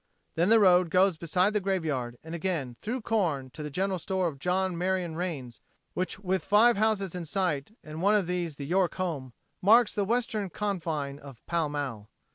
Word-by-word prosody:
Then 170 +4 +2
the 225 0 +7
road 180 -3 +5
goes 185 +1 +4
beside 180 +5 +1
the 210 - +2
graveyard 155 -11 -2
and 160 +1 -8
again 165 -7 -2
through 245 +4 -3
corn 165 - -1
to 155 - -9
the 150 - -4
general 190 +4 -1
store 190 +2 -1
of 140 -4 -6
John 185 +3 0
Marion 180 -1 -1
Rains, 150 -9 -5 0.3
which 185 - -2
with 190 -1 -1
five 225 +4 +5
houses 200 -3 +1
in 180 -1 -4
sight 180 - -2
and 155 +1 -7
one 205 +3 +4
of 205 -3 +2
these 175 -3 -2
the 140 - -6
York 180 +3 +1
home 150 -9 -3 0.3
marks 220 +4 +5
the 205 - 0
western 215 -2 -1
confine 160 -8 -3
of 135 -5 -13
Pall 165 -3 0
Mall. 130 -8 -4
180 Hz, 190 wpm, -28 LUFS, 150-195 Hz, 0.3 s, the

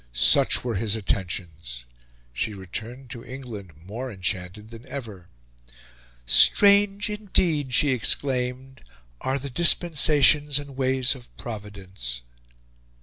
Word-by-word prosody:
Such 60 +1 +4
were 120 -2 -3
his 110 +1 0
attentions. 85 - -5 0.5
She 105 - -4
returned 110 +7 -9
to 120 -3 -9
England 120 - -10
more 120 +6 -7
enchanted 95 +2 -5
than 115 0 -12
ever. 105 -10 -9 1.0
"Strange 200 - +5
indeed," 175 -9 0
she 145 - +2
exclaimed, 130 +1 -2 0.4
"are 135 +1 -2
the 140 0 -8
dispensations 150 -2 +4
and 140 -2 -7
ways 130 0 +1
of 125 -3 -15
Providence!" 100 - -7
125 Hz, 105 wpm, -23 LUFS, 100-140 Hz, 1.0 s, Strange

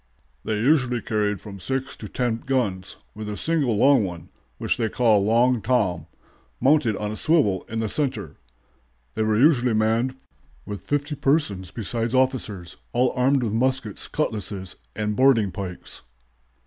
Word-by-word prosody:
"They 110 -1 -1
usually 130 -1 +2
carried 105 -3 -1
from 100 -1 -10
six 130 +8 -3
to - - -8
ten 120 -3 -1
guns, 115 -8 -2 0.2
with 105 0 -6
a 105 - -4
single 145 -9 +1
long 135 0 +5
one, 90 -3 -6 0.3
which - - -1
was 115 -2 +1
called 105 -5 +3
'Long 120 +1 +3
Tom,' 100 -7 0 0.5
mounted 135 -4 +3
on 105 0 -3
a - - -4
swivel 120 - +2
in 115 0 -2
the 110 - -1
center. 135 +3 -2 0.8
They 110 - -2
were 110 0 +2
usually 125 -3 +4
manned 115 +4 +1 0.5
with 105 -1 -6
fifty 145 +1 -2
persons 135 - 0
besides 115 +3 -3
officers, 115 -9 -1 0.2
all 125 +1 +2
armed 130 +1 +2
with 110 -3 -1
muskets, 130 -2 -1
cutlasses, 100 -9 -3 0.2
and 105 -1 -2
boarding 120 -6 +4
pikes." 90 -2 -6
115 Hz, 150 wpm, -24 LUFS, 105-130 Hz, 0.8 s, long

